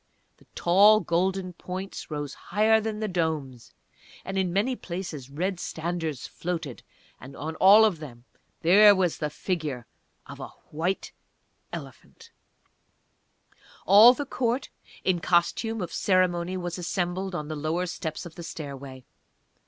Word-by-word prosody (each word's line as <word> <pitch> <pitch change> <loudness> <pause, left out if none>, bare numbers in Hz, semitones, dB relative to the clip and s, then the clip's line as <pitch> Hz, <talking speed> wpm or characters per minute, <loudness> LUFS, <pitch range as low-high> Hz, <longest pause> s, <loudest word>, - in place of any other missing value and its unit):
The - - -24
tall 200 +5 +6
golden 185 +2 -1
points 185 +3 -7
rose 145 -2 -4
higher 220 +1 +2
than 215 -1 -4
the 215 - -1
domes, 155 - -3 0.5
and 195 - -5
in 190 -2 0
many 210 +8 +1
places 170 - -6
red 180 +6 -2
standards 160 -5 -4
floated, 165 -7 -5 0.4
and 135 +3 -11
on 160 +2 -5
all 205 +4 +8
of 195 -7 0
them 125 -6 -11 0.4
there 205 +5 +7
was 180 -3 0
the 150 - -1
figure 150 -6 -3 0.4
of - - -11
a - - -6 0.2
White 170 +5 -2 0.6
Elephant! 460 0 -10 1.5
All 220 +5 +8
the 290 - -4
Court, 250 0 -1 0.3
in 185 -2 +1
costume 185 +6 +1
of 170 - -6
ceremony 185 -1 +1
was 175 0 -4
assembled 180 +1 -2
on 150 -3 -4
the 155 - -4
lower 155 +4 -1
steps 165 -2 -5
of 170 - -9
the 170 - -10
stairway. 140 -5 -8
175 Hz, 135 wpm, -26 LUFS, 155-195 Hz, 1.5 s, all